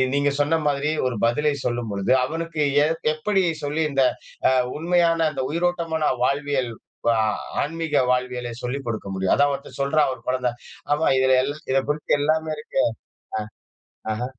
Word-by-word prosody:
நீங்க 140 0 +2
சொன்ன 160 +3 +2
மாதிரி 145 +2 0 0.2
ஒரு 120 - -4
பதிலை 150 +5 +1
சொல்லும் 120 -2 -2
பொழுது 100 +4 -1
அவனுக்கு 165 +2 -3 0.2
ஏ - - +3 0.3
எப்படி 195 +4 +1 0.2
சொல்லி 150 +3 0
இந்த 135 -1 +3 0.5
அ - - +3 0.3
உண்மையான 165 0 +2
இந்த 130 - -2
உயிரோட்டமான 165 -2 0 0.2
வாழ்வியல் 140 -3 0 0.4
பா 115 - +5 0.5
ஆன்மீக 160 0 -2
வாழ்வியலை 125 -1 -1
சொல்லிக் 135 +2 -3
கொடுக்க 110 -3 -3
முடியும்? 95 0 +1
அதான் 145 0 +3
ஒருத்தன் 140 +1 -8
சொல்றான் 145 0 +2
"ஒரு - - -12
குழந்த, 125 -1 +1 0.4
அம்மா 150 +2 +1
இதுல 130 0 +4
எல் 145 +2 -2 0.2
இதை 135 0 +3
குறித்து 150 0 +1
எல்லாமே 155 +1 +1
இருக்கு" 150 -3 -1 1.3
ஆ. - - -1
ஆஹ. 120 +3 -3
145 Hz, 155 wpm, -23 LUFS, 130-160 Hz, 1.3 s, பா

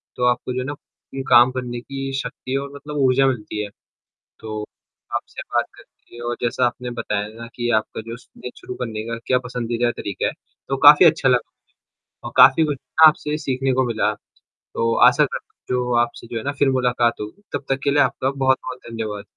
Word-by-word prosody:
तो 125 - -3
आपको 125 +1 0
जो 130 - -2
है 130 - -3
ना 145 - -4 0.6
काम 120 +2 +7
करने 125 -1 -4
की 135 +1 -5
शक्ति 135 -1 -4
और 140 0 -5
मतलब 150 +1 -7
ऊर्जा 135 +1 +4
मिलती 105 -4 -2
है। 105 - -6 0.7
तो 110 -1 -5 0.5
आपसे - - -4
बात - - +3
करके 120 - -18
और 120 - -2
जैसा 120 +1 +1
आपने 125 0 -4
बताया 105 0 -2
ना 115 +1 -9
कि 120 -1 -2
आपका 110 - -9
जो 115 0 -6
सुबह 125 0 -11
शुरू 125 - -7
करने 115 -4 -4
का 115 0 -3
क्या 125 - +3
पसंदीदा 120 -1 -1
तरीका 100 -2 -3
है। - - -1 0.4
तो 135 - 0
काफ़ी 150 +4 +10
अच्छा 155 -4 +4
लगा 125 -2 +2 0.5
मुझे - - -16
और - - -5
काफ़ी 135 +4 +7
कुछ 150 -2 -1
ना 135 +5 +5
आपसे 150 0 -1
सीखने 135 -2 -1
को 130 +1 +2
मिला। 110 -2 0 0.4
तो 115 0 -2
आशा - - +4
करता - - -7
हूँ 125 - -4
जो 125 0 -1
आपसे 120 0 -8
जो 115 - -5
है 110 - -4
ना 140 - -1
फ़िर 140 - +4
मुलाकात 125 -3 +1
होगी। 105 - -8
तब - - -3
तक 135 0 +1
के 140 - +2
लिए 145 +1 +4
आपका 135 - -1
बहुत 135 -1 +2
बहुत 130 0 -6
धन्यवाद। 110 -3 -4
125 Hz, 210 wpm, -21 LUFS, 115-135 Hz, 0.7 s, काफ़ी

